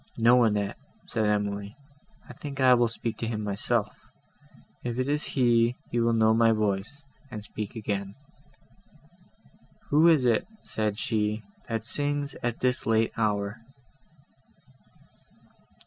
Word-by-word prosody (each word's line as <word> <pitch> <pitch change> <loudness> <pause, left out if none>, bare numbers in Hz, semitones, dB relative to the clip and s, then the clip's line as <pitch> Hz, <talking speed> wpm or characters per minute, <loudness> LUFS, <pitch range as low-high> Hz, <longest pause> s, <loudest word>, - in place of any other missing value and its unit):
"No, 120 +2 +5
Annette," 105 -2 -1 0.3
said 110 -1 0
Emily, 105 0 -1 0.5
"I - - -10
think 140 -2 -8
I 130 -1 +6
will 120 -1 +4
speak 115 -1 -5 0.2
myself; 100 -2 -1 0.9
if 120 -1 -3
it 130 +1 0
is 150 +1 +2
he, 120 -1 +3 0.2
he 120 - 0
will 115 0 +2
know 110 -1 +4
my 115 0 +4
voice, 105 +6 -2 0.3
and 110 -4 -7
speak 105 0 -6
again." 100 -3 -3 1.8
"Who 155 +3 +6
is 155 -6 +5
it," 115 -3 +2 0.2
said 105 -2 -2
she, 105 -1 -1 0.3
"that 115 -1 -2
sings 145 +2 0
at 120 -1 -3
this 125 -2 +1
late 110 0 +2
hour?" 105 -1 -1
115 Hz, 125 wpm, -27 LUFS, 105-125 Hz, 1.8 s, I